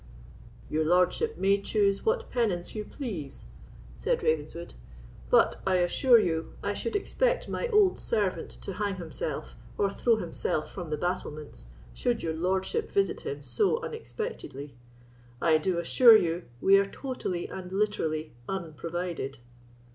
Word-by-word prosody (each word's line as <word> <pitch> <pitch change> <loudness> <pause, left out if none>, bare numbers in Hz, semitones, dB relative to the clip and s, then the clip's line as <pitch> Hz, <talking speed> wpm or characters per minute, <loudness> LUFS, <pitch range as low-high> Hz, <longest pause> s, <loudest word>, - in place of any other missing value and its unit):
"Your 155 +1 0
lordship 180 - +2
may 195 +1 +3
choose 200 -1 +1
what 460 +1 0
penance 205 -8 0
you 215 - -3
please," 195 - -6 0.5
said - - -1
Ravenswood; 160 +2 -1 0.6
"but - - +4
I 190 -1 +2
assure 210 +8 +5
you, 165 -6 0
I - - 0
should 460 - -3
expect - - +1
my - - -2
old 420 -5 +4
servant 210 -5 -1
to 195 - -5
hang 200 0 -1
himself, 160 -3 -5 0.2
or 200 -1 +2
throw 230 +3 +3
himself 165 -5 -2
from 175 -4 -6
the 150 - -1
battlements, 155 -3 -4 0.3
should 245 -1 -1
your 160 - -1
lordship 190 - -1
visit 395 -1 +1
him 445 -2 -5
so 445 +2 +1
unexpectedly. 290 - -6 0.7
I 160 0 +4
do 180 +2 0
assure 225 +7 +7
you, 170 -2 -1
we 195 +7 +6
are 200 - +2
totally 195 -8 -4
and 185 -1 -7
literally 160 - -1 0.2
unprovided." 170 -4 -4
190 Hz, 140 wpm, -28 LUFS, 165-240 Hz, 0.7 s, assure